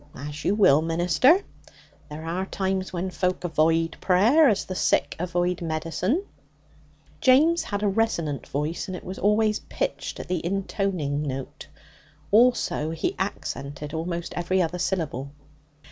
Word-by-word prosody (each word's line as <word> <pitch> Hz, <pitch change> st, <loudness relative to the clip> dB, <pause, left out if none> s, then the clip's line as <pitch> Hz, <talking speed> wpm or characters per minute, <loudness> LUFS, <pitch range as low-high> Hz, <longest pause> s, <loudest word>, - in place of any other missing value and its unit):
'As 145 Hz, +3 st, -7 dB
you 200 Hz, -, +2 dB
will, 155 Hz, -8 st, +5 dB
minister. 175 Hz, -, +3 dB, 0.7 s
There 155 Hz, +2 st, -7 dB
are 180 Hz, +4 st, -2 dB
times 190 Hz, -1 st, -2 dB
when 185 Hz, +1 st, -3 dB
folk 185 Hz, +1 st, -1 dB
avoid 165 Hz, 0 st, +1 dB
prayer 235 Hz, -, +5 dB
as 205 Hz, -, 0 dB
the 185 Hz, -, -5 dB
sick -, -, +1 dB
avoid 180 Hz, 0 st, -1 dB
medicine.' 170 Hz, -, -1 dB, 0.9 s
James 310 Hz, +7 st, +5 dB
had 205 Hz, 0 st, -4 dB
a -, -, +3 dB
resonant 170 Hz, -, -1 dB
voice, 150 Hz, +7 st, -3 dB
and 185 Hz, -1 st, -4 dB
it -, -, -11 dB
was 185 Hz, +1 st, -7 dB
always 210 Hz, +1 st, +2 dB
pitched -, -, -4 dB
on -, -, -5 dB
the 180 Hz, -3 st, -2 dB
intoning 185 Hz, -5 st, -1 dB
note. 135 Hz, -3 st, -5 dB, 0.6 s
Also, 225 Hz, -8 st, +3 dB
he 160 Hz, 0 st, -2 dB
accented 145 Hz, -6 st, -4 dB
almost 170 Hz, +1 st, -3 dB
every 175 Hz, +2 st, 0 dB
other 180 Hz, 0 st, 0 dB
syllable. 145 Hz, -7 st, -2 dB
180 Hz, 140 wpm, -25 LUFS, 160-200 Hz, 0.9 s, will